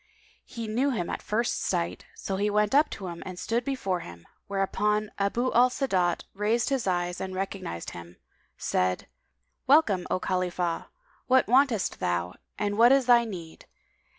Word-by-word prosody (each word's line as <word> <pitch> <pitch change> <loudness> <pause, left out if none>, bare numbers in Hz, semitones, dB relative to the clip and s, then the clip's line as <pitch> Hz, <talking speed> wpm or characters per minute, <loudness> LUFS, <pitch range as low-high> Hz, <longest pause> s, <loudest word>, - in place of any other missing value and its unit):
He 230 -3 -6
knew 245 +6 +1
him 200 -10 -2
at - - -4
first 230 +3 -1
sight; 175 -2 -2
so 195 - -4
he 205 +2 +1
went 210 +1 +1
up 295 +2 +5
to 195 - -7
him 170 -2 -6
and 185 -1 -7
stood 230 +6 -1
before 215 -9 -1
him, 85 - -11 0.2
whereupon 210 +2 0
Abu 235 +6 0
al 245 +2 +6
Sa'adat 185 -10 0
raised 220 +5 +1
his 265 -6 -1
eyes 175 -1 -1
and 190 0 -4
recognising 190 - -4
him, 85 0 -11 0.4
said, 90 0 0 0.6
"Welcome, 225 - +4
O - - 0
Khalifah! 180 -2 -1 0.4
What 260 0 +5
wantest 250 -3 +2
thou 90 0 -1 0.2
and 205 0 -1
what 240 +2 +7
is 270 -1 +4
thy 240 -1 +5
need? 175 -7 -9
200 Hz, 160 wpm, -27 LUFS, 180-240 Hz, 0.6 s, what